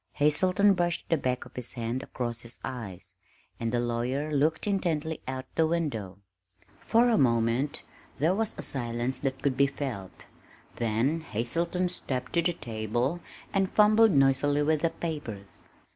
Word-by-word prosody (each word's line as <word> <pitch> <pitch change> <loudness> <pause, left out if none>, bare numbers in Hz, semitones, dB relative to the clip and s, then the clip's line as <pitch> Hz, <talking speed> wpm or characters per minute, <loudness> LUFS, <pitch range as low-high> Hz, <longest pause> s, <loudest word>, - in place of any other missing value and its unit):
Hazelton 185 +7 +4
brushed 175 -2 0
the 165 - +4
back 125 -3 -1
of - - -16
his 125 -2 -4
hand 120 +1 -2
across 120 -3 -4
his 115 0 -6
eyes, 95 -8 -6 0.4
and 115 -1 -1
the 120 - +1
lawyer 125 +5 -1
looked 155 +3 +2
intently 165 -6 -1
out 130 0 -4
the 160 -1 +3
window. 135 - -2 0.6
For 235 +2 +3
a 225 - +3
moment 120 +3 +2 0.3
there 160 +5 +3
was 220 +2 -1
a - - -4
silence 120 0 -2
that 135 -2 -3
could 140 -3 +2
be 140 +1 +4
felt, 130 -9 -6 0.5
then 120 +7 +1
Hazelton 170 - -1
stepped 130 -7 -4
to 170 - +3
the 175 +1 +1
table 120 +5 -2 0.3
and 195 -1 +1
fumbled 215 +1 +6
noisily 140 +1 +3
with 155 0 +2
the 165 - +3
papers. 135 -14 -6
135 Hz, 155 wpm, -28 LUFS, 120-165 Hz, 0.6 s, fumbled